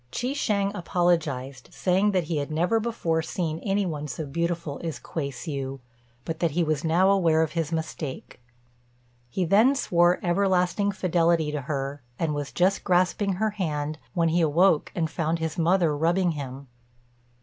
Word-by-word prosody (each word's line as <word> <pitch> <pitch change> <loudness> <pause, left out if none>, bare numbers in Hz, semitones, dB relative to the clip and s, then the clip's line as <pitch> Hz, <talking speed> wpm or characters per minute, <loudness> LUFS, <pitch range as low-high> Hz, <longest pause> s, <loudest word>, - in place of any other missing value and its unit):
Chi 250 - -2
shêng 200 -7 0
apologized, 155 -9 -1
saying 190 +3 +2
that 185 -3 +1
he 160 0 -2
had 145 0 -2
never 175 +9 +1
before 195 -8 -1
seen 160 0 -3
any 200 +1 0
one 150 -4 -4
so 155 +2 -5
beautiful 170 0 -3
as 165 -2 -3
Kuei 145 -4 -4
hsiu, 135 0 -5 0.5
but 160 -1 -4
that 170 - +2
he 175 - +4
was 155 -2 -1
now 175 +4 +3
aware 165 -5 +3
of 155 - -2
his 165 -1 -2
mistake. 155 -5 -5 0.9
He 180 +8 -1
then 220 +10 +5
swore 175 -8 +3
everlasting 185 +2 +2
fidelity 170 -4 +1
to 150 -1 -3
her, 140 0 -4 0.2
and 160 -2 -1
was 145 -1 -4
just 185 +2 +1
grasping 185 +2 +2
her 215 +4 0
hand, 155 -6 -3 0.2
when 165 -2 +2
he 170 +2 +2
awoke 165 +1 +3
and 165 -2 0
found 160 +1 -1
his 160 +1 -3
mother 170 -2 +3
rubbing 170 +4 +2
him. 140 -2 -7
165 Hz, 165 wpm, -26 LUFS, 150-185 Hz, 0.9 s, then